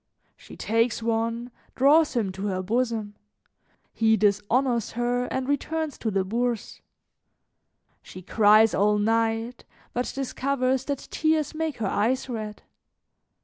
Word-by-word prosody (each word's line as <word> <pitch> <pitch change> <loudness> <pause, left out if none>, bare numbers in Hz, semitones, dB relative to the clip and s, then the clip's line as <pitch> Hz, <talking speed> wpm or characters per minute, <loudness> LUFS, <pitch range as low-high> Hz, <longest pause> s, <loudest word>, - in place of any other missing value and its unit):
She - - -14
takes 230 +1 0
one, 230 +1 -1 0.2
draws 290 +2 +4
him 215 -5 0
to 190 +2 -4
her 185 -1 -2
bosom; 225 0 -1 0.8
he 220 0 +3
dishonors 215 +4 +1
her 245 +1 0
and 260 0 -3
returns 305 +1 -2
to 225 - -1
the 195 -2 0
Bourse. 235 +2 -2 1.2
She 185 - -11
cries 215 +2 +5
all 210 +1 +3
night, 225 +2 0 0.3
but 245 +1 -2
discovers 265 -1 -1
that 285 -2 -4
tears 315 -1 +1
make 315 -2 -3
her 225 - -3
eyes 230 +8 0
red. 215 -4 -6
230 Hz, 125 wpm, -25 LUFS, 215-260 Hz, 1.2 s, cries